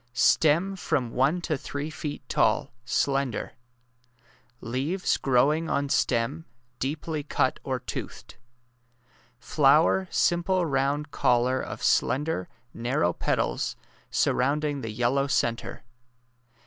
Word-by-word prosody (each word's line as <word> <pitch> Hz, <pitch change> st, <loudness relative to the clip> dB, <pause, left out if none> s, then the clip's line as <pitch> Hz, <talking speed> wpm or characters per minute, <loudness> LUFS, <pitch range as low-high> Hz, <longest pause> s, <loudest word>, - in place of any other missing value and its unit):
Stem 160 Hz, +10 st, +3 dB
from 125 Hz, -9 st, -1 dB
one 140 Hz, +9 st, +1 dB
to 165 Hz, -3 st, -1 dB
three 145 Hz, +2 st, -5 dB
feet 150 Hz, -2 st, -6 dB
tall— -, -, +1 dB
slender. 135 Hz, -4 st, 0 dB, 1.1 s
Leaves 135 Hz, +11 st, -1 dB
growing 140 Hz, +5 st, +2 dB
on 140 Hz, 0 st, 0 dB
stem— 135 Hz, +7 st, 0 dB, 0.3 s
deeply 150 Hz, +3 st, -3 dB
cut 140 Hz, -2 st, 0 dB
or 130 Hz, -2 st, -2 dB
toothed. -, -, -7 dB, 1.0 s
Flower 150 Hz, +8 st, +3 dB
simple 175 Hz, +1 st, +1 dB
round 140 Hz, 0 st, 0 dB
collar 125 Hz, 0 st, +2 dB
of -, -, -7 dB
slender, 145 Hz, -, +1 dB, 0.2 s
nar 120 Hz, +3 st, -2 dB
row 85 Hz, 0 st, +2 dB
petals -, -, -1 dB, 0.3 s
surrounding 145 Hz, +2 st, +1 dB
the 115 Hz, -, -5 dB
yellow 125 Hz, +5 st, +1 dB
centre. 120 Hz, -3 st, -1 dB
140 Hz, 105 wpm, -26 LUFS, 125-155 Hz, 1.1 s, Stem